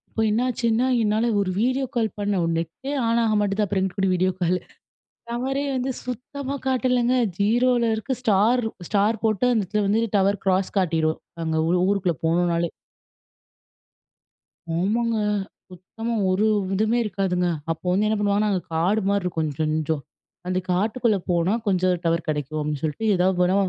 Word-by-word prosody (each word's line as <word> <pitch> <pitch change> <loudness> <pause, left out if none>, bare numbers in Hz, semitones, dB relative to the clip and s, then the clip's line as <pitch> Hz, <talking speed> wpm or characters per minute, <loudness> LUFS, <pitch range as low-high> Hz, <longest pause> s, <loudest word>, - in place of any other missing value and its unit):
இப்போ 225 - -3
என்னாச்சுன்னா, 235 +1 +1 0.2
என்னால 215 +1 +1
ஒரு 200 -2 0
வீடியோ 260 +3 +1
கால் 225 -2 +1
பண்ண 205 -2 0 0.2
நெட்டே 170 - -4
ஆன் 230 +1 +2
ஆகமாட்டுது. 210 -2 +1
அப்பறம் 195 -1 -1
எங்கிட்டுகூடி 190 0 0
வீடியோ 185 +1 +2
கால்! 180 0 +1 0.7
டவரே 265 +4 -1
வந்து 260 +1 -1
சுத்தமா 260 +3 -5
காட்டலங்க. 250 -1 +2 0.2
0ல 235 +3 +2
இருக்கு. 260 +5 -2
ஸ்டார் 225 +2 +3
இருக் 220 -5 -6
ஸ்டார் 210 +1 +1
போட்டு 215 +1 +1
அந்த 225 -3 +2
இடத்துல 210 +3 -1
வந்து 210 +3 +2 0.2
டவர் 195 0 +1
கிராஸ் 190 0 +1
காட்டிரும். 160 -3 +1 0.3
அங்க 160 0 0
ஊ - - +1 0.2
ஊருக்குள்ள 185 -5 0
போனோனாலே! 170 0 +1 2.1
ஆமாங்க. 225 +5 +1 0.5
சுத்தமா 195 +6 -6 0.2
ஒரு 190 +3 +2 0.3
இதுவுமே 220 +4 +1
இருக்காதுங்க. 180 -3 0 0.2
அப்போ 165 +2 -6
வந்து 195 +4 +2
என்ன 215 - +1
பண்ணுவாங்கன்னா, 205 +1 +2
அங்க 185 -2 0
காடுமாரி 200 +4 +1
இருக்கும். 180 -2 -4 0.2
கொஞ்சம் - - -24
கொஞ்சோம் 155 -2 -1 0.4
அந்த 185 0 0
காட்டுக்குள்ள 215 +4 +1
போனா, 175 +2 +2
கொஞ்சம் 185 -2 +2
டவர் 165 0 0
கிடைக்கும் 150 0 -2
அப்பிடின்னு 150 -2 -3
சொல்லிட்டு, 155 +8 -2
ஏதாவது 180 0 +1
வேணா 180 +1 +3
200 Hz, 145 wpm, -23 LUFS, 180-230 Hz, 2.1 s, ஸ்டார்